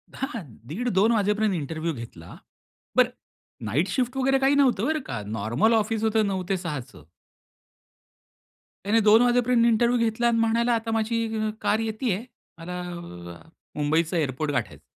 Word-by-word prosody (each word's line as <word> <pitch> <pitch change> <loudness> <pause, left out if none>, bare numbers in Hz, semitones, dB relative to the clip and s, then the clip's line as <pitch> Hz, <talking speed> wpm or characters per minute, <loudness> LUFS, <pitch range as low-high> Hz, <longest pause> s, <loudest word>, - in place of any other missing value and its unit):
हां, 255 -6 -4 0.2
दीड 225 - -2
2:00 200 +5 +4
वाजेपर्यंत 210 -1 +1
इंटरव्ह्यू 160 +1 -3
घेतला. 115 - -10 0.6
बरं, - - +5 0.6
नाईट 140 - 0
शिफ्ट 250 +5 -1
वगैरे 270 +1 +3
काही 270 +1 +3
नव्हतं 255 -7 +3
बरं 310 +2 0
का! - - -4
नॉर्मल 110 - +1
ऑफिस 220 0 0
होतं 220 -1 +2
9:00 190 -2 -2
ते 195 - +1
6:00चं. 150 -8 -6 1.8
त्याने 215 +3 +3
2:00 220 +2 +7
वाजेपर्यंत 245 -1 +3
इंटरव्ह्यू 235 +1 +3
घेतला 235 +2 0
अन् 235 -1 +2
म्हणाला, 230 +1 +2
"आता 225 0 -1
माझी 225 +1 0 0.2
अ, 215 0 0
कार 215 - +1
येती 225 +2 -2
आहे. 200 +6 -3 0.3
मला 180 +2 -6
अ, 160 - -9 0.3
मुंबईचा 160 +4 +1
एअरपोर्ट 145 0 -1
गाठायचं." 140 - -3
215 Hz, 150 wpm, -25 LUFS, 165-235 Hz, 1.8 s, 2:00